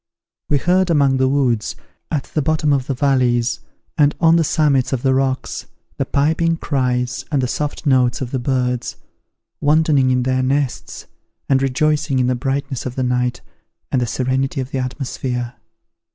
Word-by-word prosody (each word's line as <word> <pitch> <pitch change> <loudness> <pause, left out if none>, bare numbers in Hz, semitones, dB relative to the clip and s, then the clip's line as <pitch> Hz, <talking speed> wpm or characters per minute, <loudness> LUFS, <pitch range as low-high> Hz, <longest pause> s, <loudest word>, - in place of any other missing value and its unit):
We 145 - +3
heard 180 +5 +2
among 140 -5 +3
the 130 0 +2
woods, 125 -5 0 0.3
at 145 -5 -1
the 155 - -2
bottom 150 0 +1
of 130 -2 -1
the 135 - -1
valleys, 125 -3 +1 0.4
and 145 0 +4
on 165 -1 +5
the 165 - +3
summits 145 -4 +2
of 125 - -2
the 130 -1 +3
rocks, 130 0 -1 0.3
the - - -1
piping 160 +3 +1
cries 125 -5 -1
and 145 - +2
the 130 - 0
soft 150 +3 -3
notes 130 -3 +3
of 130 -2 -5
the 130 - -1
birds, 125 -1 -1 0.7
wantoning 150 -3 +3
in 125 -1 +2
their 130 0 +1
nests, 135 0 -2 0.4
and 135 -1 +3
rejoicing 140 +1 +1
in 125 - +2
the 125 - +2
brightness 135 +1 -2
of 125 - -6
the 130 - -1
night 125 0 0 0.5
and 130 - +1
the 120 - 0
serenity 130 +3 -1
of 130 +1 -4
the 135 - -2
atmosphere. 125 -2 -3
130 Hz, 170 wpm, -19 LUFS, 125-145 Hz, 0.7 s, on